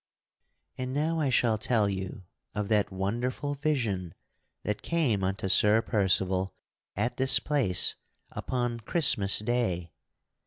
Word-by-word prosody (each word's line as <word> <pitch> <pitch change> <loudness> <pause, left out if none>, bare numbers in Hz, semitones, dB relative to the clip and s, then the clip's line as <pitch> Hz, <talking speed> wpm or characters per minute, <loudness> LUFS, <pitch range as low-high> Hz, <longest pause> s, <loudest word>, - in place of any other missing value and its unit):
And 130 +1 -3
now 160 +3 0
I 145 -3 +1
shall 115 -3 +2
tell 110 -2 +1
you 95 0 -5 0.3
of 105 -1 -2
that 105 -3 +2
wonderful 120 +9 -2
vision 115 - -2 0.5
that 105 - -3
came 135 - 0
unto 95 +1 -2
Sir 105 +4 +4
Percival 95 -3 +1 0.5
at 115 +5 -2
this 130 -1 +4
place 120 -12 +2 0.4
upon 120 -2 -3
Christmas 110 - +3
day. 105 -7 -1
110 Hz, 120 wpm, -28 LUFS, 95-130 Hz, 0.5 s, Sir